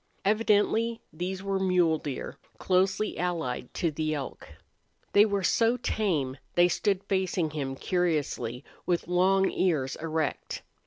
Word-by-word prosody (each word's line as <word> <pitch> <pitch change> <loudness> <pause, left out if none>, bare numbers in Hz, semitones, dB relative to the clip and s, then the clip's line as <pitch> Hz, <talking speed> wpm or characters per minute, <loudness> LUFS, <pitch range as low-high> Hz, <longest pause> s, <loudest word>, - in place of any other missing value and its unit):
Evidently 220 +2 +2
these 185 +4 -4
were 195 -1 0
mule 180 -4 +3
deer, 140 -3 -5 0.2
closely 190 +3 +1
allied 165 -9 -2
to 170 -3 -1
the 155 0 -1
elk. 140 -3 -6 0.6
They 205 +1 +7
were 200 -2 -1
so 230 +5 +3
tame 160 - -1 0.2
they 175 0 +5
stood 195 +1 0
facing 190 -5 0
him 135 -3 -3
curiously, 150 -8 -1 0.2
with 175 -2 0
long 190 +2 +3
ears 150 -8 0
erect. 160 -2 -3
180 Hz, 125 wpm, -28 LUFS, 155-195 Hz, 0.6 s, They